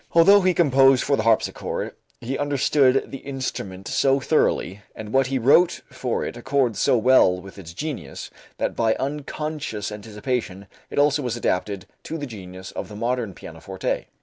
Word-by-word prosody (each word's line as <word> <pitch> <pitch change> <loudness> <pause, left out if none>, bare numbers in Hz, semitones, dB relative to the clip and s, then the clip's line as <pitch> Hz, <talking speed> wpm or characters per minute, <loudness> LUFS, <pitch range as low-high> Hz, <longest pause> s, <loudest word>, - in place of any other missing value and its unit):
Although 195 +5 +7
he 185 -1 +2
composed 135 -5 +5
for 140 - +2
the 110 - -1
harpsichord, 115 0 0 0.3
he 125 +3 -4
understood 140 -1 +2
the 135 - -6
instrument 125 -9 -5
so 135 0 +2
thoroughly 105 - +1
and 110 0 -8
what 135 -1 +3
he 135 0 -1
wrote 145 +8 +4
for 130 -2 -2
it - - -5
accords 125 -2 0
so 125 - +3
well 110 -6 +4
with 95 +2 -12
its 85 -4 -9
genius, 150 - -6 0.3
that - - -2
by 110 -1 +2
unconscious 145 -5 -4
anticipation 105 -1 -4 0.2
it - - -8
also 145 +1 +3
was 120 -3 -2
adapted 100 -3 -1 0.2
to 165 - -5
the 145 - -4
genius 95 -6 -9
of 95 - -6
the 105 - -9
modern 115 -3 -2
pianoforte. 90 +4 -5
125 Hz, 165 wpm, -23 LUFS, 105-140 Hz, 0.3 s, Although